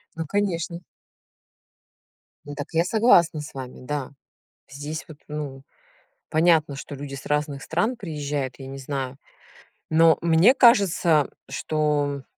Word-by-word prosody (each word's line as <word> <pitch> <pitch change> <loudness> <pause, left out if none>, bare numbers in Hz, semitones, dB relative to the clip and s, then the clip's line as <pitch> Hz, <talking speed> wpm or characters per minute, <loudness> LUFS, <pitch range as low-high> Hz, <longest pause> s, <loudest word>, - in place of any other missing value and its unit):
Ну, 165 0 -4
конечно. 175 -2 -1 1.6
Ну, 145 - -7
так 145 -1 -5
я 165 - +3
согласна 180 - +4
с 150 - -9
вами. 130 -2 -8
Да. 145 0 -4 0.6
Здесь 145 +3 -6
вот, 155 -3 -12
ну, 145 -3 -6 0.7
понятно, 160 -2 +3
что 140 - -8
люди 140 0 -7
с 135 - -9
разных 150 -2 -1
стран 215 +10 -1
приезжают, 145 - -4
я 135 - -9
не 135 +1 -7
знаю. 135 -1 -4 0.7
Но 160 0 +5
мне 170 +9 +5
кажется, 185 - +4 0.2
что, 145 -3 -1
150 Hz, 125 wpm, -24 LUFS, 140-170 Hz, 1.6 s, Но